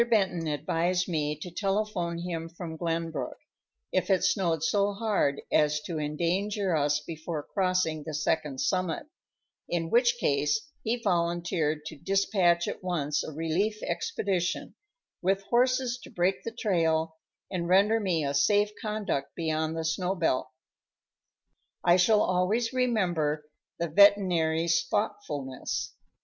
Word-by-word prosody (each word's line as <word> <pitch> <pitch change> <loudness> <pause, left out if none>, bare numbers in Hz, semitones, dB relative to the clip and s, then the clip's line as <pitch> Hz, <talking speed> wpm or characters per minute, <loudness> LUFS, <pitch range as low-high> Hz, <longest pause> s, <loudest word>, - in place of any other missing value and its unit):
Benton 190 -7 +1
advised 170 +4 0
me 150 -4 -1
to 175 +4 -8
telephone 195 -2 -1
him 170 -1 -4
from 165 -1 -7
Glenbrook, 165 -1 -3 0.5
if 185 +1 0
it 190 -2 +3
snowed 180 -4 +1
so 200 +3 +2
hard 200 -10 0
as 150 0 +3
to 160 0 -4
endanger 180 +5 0
us 145 -1 +2
before 160 0 -5
crossing 185 -5 0
the 155 -1 -5
second 150 -3 -1
summit, 185 - 0 0.6
in 165 -1 -1
which 240 0 +4
case 145 -1 +2 0.2
he 225 +2 0
volunteered 170 -4 0
to 155 - -6
dispatch 185 -1 +2
at - - -4
once 150 -5 -1
a - - -6
relief 165 +8 -1
expedition, 195 - -2 0.5
with 195 +2 +1
horses 250 0 +2
to - - -11
break 180 +2 0
the 230 - -4
trail 165 -8 0 0.3
and 175 -2 -2
render 205 +4 +4
me 180 -7 0
a 140 - -1
safe 205 +9 +3
conduct 210 -10 -2
beyond 160 -1 -1
the 160 - -2
snow 180 +4 0
belt. 145 -8 0 1.3
I 175 0 +5
shall 210 +4 +4
always 205 +7 +1
remember 175 -12 0 0.3
the 170 - -1
veterinary's 170 -3 +4
thoughtfulness. 150 -11 -3
175 Hz, 130 wpm, -28 LUFS, 160-200 Hz, 1.3 s, I